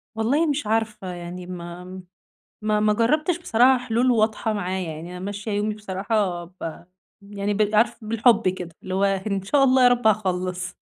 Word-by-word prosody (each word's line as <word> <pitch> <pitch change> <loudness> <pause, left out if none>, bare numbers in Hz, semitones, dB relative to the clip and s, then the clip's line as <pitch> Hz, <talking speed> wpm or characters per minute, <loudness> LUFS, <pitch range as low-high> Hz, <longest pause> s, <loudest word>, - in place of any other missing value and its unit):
والله 260 +9 +2
مش 290 -6 -1
عارفة 215 -3 -1
يعني 175 +1 -7
ما 180 +1 -8 0.6
ما 215 0 +1
ما 210 0 +3
جربتش 305 - +1
بصراحة 255 -4 +4
حلول 240 +3 +2
واضحة 220 -1 +1
معايا، 185 -3 -3
يعني 165 +3 -8
أنا 180 - -7
ماشية 205 +2 -5
يومي 210 +1 0
بصراحة 195 -3 -2
ب 170 -2 -8 0.4
يعني 200 0 -3
ب 210 +1 +1
عارف 220 +1 +2
بالحب 225 -1 +3
كده، 180 -2 -4
اللي 185 0 -4
هو 195 - +2
إن 195 0 0
شاء 275 +8 +3
الله 260 0 +4
يا 245 - +8
رب 245 -2 +1
هاخلّص. 185 -3 0
210 Hz, 170 wpm, -23 LUFS, 185-225 Hz, 0.6 s, يا